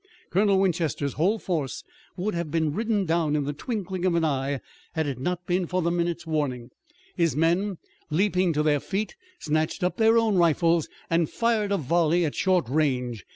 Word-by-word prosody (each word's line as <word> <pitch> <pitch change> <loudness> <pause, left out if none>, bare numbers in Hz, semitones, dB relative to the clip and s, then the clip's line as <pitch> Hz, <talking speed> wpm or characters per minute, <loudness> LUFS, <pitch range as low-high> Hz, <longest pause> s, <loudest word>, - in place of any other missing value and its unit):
Colonel 200 +1 +3
Winchester's 165 -7 0
whole 190 +8 +2
force 160 -10 -3 0.3
would 200 +4 -1
have 170 -2 -3
been 160 -1 0
ridden 215 0 0
down 160 -3 +1
in 150 - +1
the 145 +1 -3
twinkling 190 - -4
of 185 -2 +2
an 165 -1 +2
eye 140 -2 0
if 135 - -4 0.3
it 160 -1 0
had 135 -4 -3
not 180 +5 -2
been 180 0 0
for 180 0 -1
the 170 - +1
minute's 170 0 -1
warning. 135 -6 -2 0.4
His 165 -6 +1
men, 175 +5 +1 0.3
leaping 185 +2 +2
to 150 0 +1
their 150 -1 +3
feet, 200 +7 -3 0.2
snatched 155 - -1
up 180 - 0
their 225 0 +5
own 220 -4 +3
rifles 165 -1 +3 0.2
and 165 -1 +1
fired 225 -3 0
a 200 - +2
volley 170 +3 +2
at 150 - -2
short 185 -8 +1
range. 125 - -1
170 Hz, 190 wpm, -26 LUFS, 150-185 Hz, 0.4 s, their